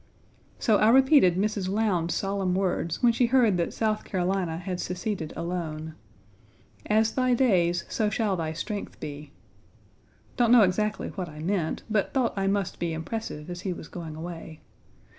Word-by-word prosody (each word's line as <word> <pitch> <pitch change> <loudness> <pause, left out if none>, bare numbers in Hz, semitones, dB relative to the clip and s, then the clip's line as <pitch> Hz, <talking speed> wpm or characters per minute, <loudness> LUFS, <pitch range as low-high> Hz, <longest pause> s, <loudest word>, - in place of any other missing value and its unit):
So 220 -4 +3
I 215 - +5
repeated 265 - +6
Mrs. 205 -1 0
Lowndes's 190 -5 0
solemn 195 -2 -1
words 180 -2 -1
when 235 -1 +6
she 240 +1 +2
heard 235 -6 +4
that 170 - -1
South 215 -1 -1
Carolina 185 -3 -1
had 180 0 -4
seceded 180 -3 -3
alone: 160 -2 -4 0.9
"As 220 +1 +3
thy 255 -1 +2
days 175 -9 +2
so 215 -1 0
shall 210 -2 0
thy 160 -3 -2
strength 205 +5 -5
be." 145 0 -7 1.1
Don't 235 -2 +3
know 240 -3 +8
exactly 210 +3 0
what 185 -4 -5
I 150 - -12
meant, 165 0 -2
but 215 +1 0
thought 255 -3 +2
I 195 -1 0
must 195 -1 -1
be 170 -1 -1
impressive 160 -2 -5
as 175 0 -6
he 190 -2 -2
was - - -9
going 165 -3 -7
away. 165 -1 -8
190 Hz, 160 wpm, -27 LUFS, 170-215 Hz, 1.1 s, know